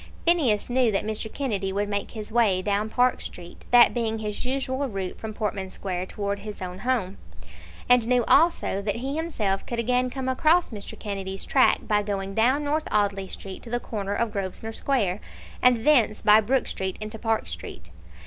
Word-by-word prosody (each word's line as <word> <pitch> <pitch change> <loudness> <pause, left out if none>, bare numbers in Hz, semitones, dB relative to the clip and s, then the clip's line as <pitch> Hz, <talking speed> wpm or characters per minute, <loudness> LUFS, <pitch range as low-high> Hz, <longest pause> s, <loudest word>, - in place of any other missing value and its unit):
Phineas 290 -12 +3
knew 245 -2 +2
that 195 - -1
Mr. 215 0 -4
Kennedy 205 -9 -2
would 205 +1 -1
make 205 0 -2
his 215 -1 -8
way 210 -6 +3
down 205 +2 0
Park 250 +2 +2
Street, 175 0 -10
that 240 -1 +7
being 225 -2 -1
his 210 -1 -4
usual 265 +1 -1
route 195 -3 -5
from 220 - -5
Portman 205 -3 -3
Square 185 -1 -4
towards 200 0 -3
his 210 0 -7
own 180 0 -6
home, 210 -5 -1 0.7
and 245 -2 +4
knew 250 -1 +3
also 320 - +3
that 205 0 -2
he 265 +4 -3
himself 220 -12 -1
could 235 - -3
again 250 +2 +1
come 260 0 -4
across 315 +6 +3
Mr. 205 -2 -8
Kennedy's 195 -2 -4
track 265 - +4
by 210 -1 +3
going 195 -1 -3
down 255 +7 +3
North 305 +2 -1
Audley 200 -2 +1
Street 190 0 -8
to 235 - -10
the 240 +1 -1
corner 205 -4 -4
of 235 +1 0
Grosvenor 200 +2 -4
Square, 215 -8 0 0.4
and 245 -2 +4
thence 245 -8 +4
by 210 +1 +7
Brook 250 +4 +1
Street 190 -1 -4
into 215 +1 -6
Park 225 -1 0
Street. - - -8
215 Hz, 185 wpm, -25 LUFS, 200-250 Hz, 0.7 s, that